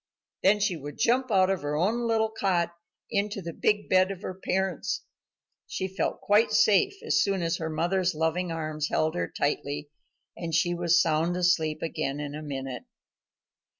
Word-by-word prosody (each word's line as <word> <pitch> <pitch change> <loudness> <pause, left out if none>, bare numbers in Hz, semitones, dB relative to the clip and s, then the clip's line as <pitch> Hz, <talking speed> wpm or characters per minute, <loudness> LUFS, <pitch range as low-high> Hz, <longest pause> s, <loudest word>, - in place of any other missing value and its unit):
Then 205 +2 +4
she 205 -3 +1
would 145 -2 -8
jump 255 +2 +2
out 190 -2 +4
of 190 - -1
her 145 0 -2
own 220 +9 +1
little 220 -1 +1
cot 180 -5 0 0.4
into 205 -1 -1
the 170 -3 -6
big 210 +4 +1
bed 185 0 +4
of 195 0 -6
her - - -4
parents. 190 0 -2 0.6
She 190 - -3
felt 190 +1 -2
quite 215 +2 +3
safe 215 - +4
as - - +2
soon 195 -3 0
as 165 +1 0
her 160 -1 -3
mother's 175 +3 0
loving 165 +3 0
arms 155 -2 -3
held 155 0 +1
her 175 - -1
tightly, 145 0 -2 0.4
and 165 -2 -3
she 175 +1 +2
was 170 -1 +3
sound 165 +2 +1
asleep 165 -4 +1
again 155 -3 -2
in 145 -1 -5
a 150 - -6
minute. 135 - -5
175 Hz, 175 wpm, -27 LUFS, 155-195 Hz, 0.6 s, Then